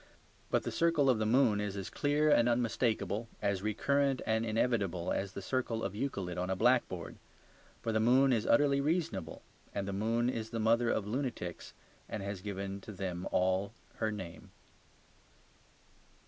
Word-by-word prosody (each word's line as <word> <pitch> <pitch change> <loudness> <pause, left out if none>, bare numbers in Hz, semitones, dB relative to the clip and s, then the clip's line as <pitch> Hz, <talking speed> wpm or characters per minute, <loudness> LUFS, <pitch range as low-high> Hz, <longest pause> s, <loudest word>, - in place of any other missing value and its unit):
But - - +1
the - - -3
circle 165 -5 +3
of 115 - 0
the 110 - +1
moon 115 -3 +4
is 100 -1 -3
as 95 - -5
clear 150 +1 +2
and 120 -3 +5
unmistakable, 115 -3 0
as 100 -2 0
recurrent 135 +6 +1
and 110 0 +1
inevitable, 110 -6 0
as 95 -1 -2
the 100 - -6
circle 120 -1 -1
of - - -2
Euclid 100 -7 -3
on 90 +1 -2
a 95 - +1
blackboard. 115 -5 +1 0.7
For 115 - 0
the 110 - +1
moon 130 +4 +5
is 115 -2 0
utterly 140 -1 +4
reasonable; 140 - -2 0.3
and 100 -1 -2
the 100 - -3
moon 115 +4 +1
is 115 -3 -2
the 115 0 -3
mother 115 +2 +3
of 105 - 0
lunatics 115 -7 -4 0.3
and 100 - -4
has 100 -1 -4
given 100 0 -5
to 110 - -9
them 90 -2 -4
all 95 +3 +1 0.2
her 110 - 0
name. 95 -5 -8
110 Hz, 165 wpm, -32 LUFS, 100-125 Hz, 0.7 s, and